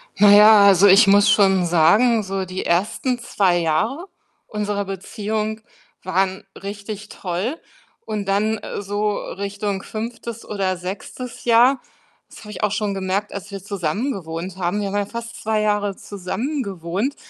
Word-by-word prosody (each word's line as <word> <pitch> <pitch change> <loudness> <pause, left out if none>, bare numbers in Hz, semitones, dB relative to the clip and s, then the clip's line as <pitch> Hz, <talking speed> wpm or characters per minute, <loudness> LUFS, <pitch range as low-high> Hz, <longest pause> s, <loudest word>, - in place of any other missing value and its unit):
Na 205 +1 +6
ja, 210 0 +8
also, 200 0 +6
ich 200 +4 +7
muss 200 +1 +5
schon 190 -3 +4
sagen, 205 +8 +4
so 190 0 -3
die 185 +1 -5
ersten 215 +8 0
2 195 -6 +1
Jahre 170 - -1 0.4
unserer 205 -1 -2
Beziehung 215 +3 -4 0.4
waren 190 +1 0
richtig 205 +1 -7
toll 195 - -4 0.5
und 210 -2 -3
dann, 210 +3 +1
äh, - - -6
so 205 +1 -1
Richtung 200 0 -4
5. 230 +1 -6
oder 195 -3 -2
6. 200 +7 -7
Jahr 245 +3 +4 0.5
das - - -13
habe 210 -1 -10
ich - - -7
auch 210 -1 +1
schon 210 -2 -1
gemerkt, 195 +2 -2
als 200 0 -7
wir 195 -2 -7
zusammengewohnt 190 - -3
haben. 185 +3 -1
Wir 200 - -2
haben 200 - -2
ja 205 - 0
fast 230 +2 -8
2 215 0 0
Jahre 205 -2 0
zusammengewohnt. 200 - -4
205 Hz, 150 wpm, -21 LUFS, 190-215 Hz, 0.5 s, ja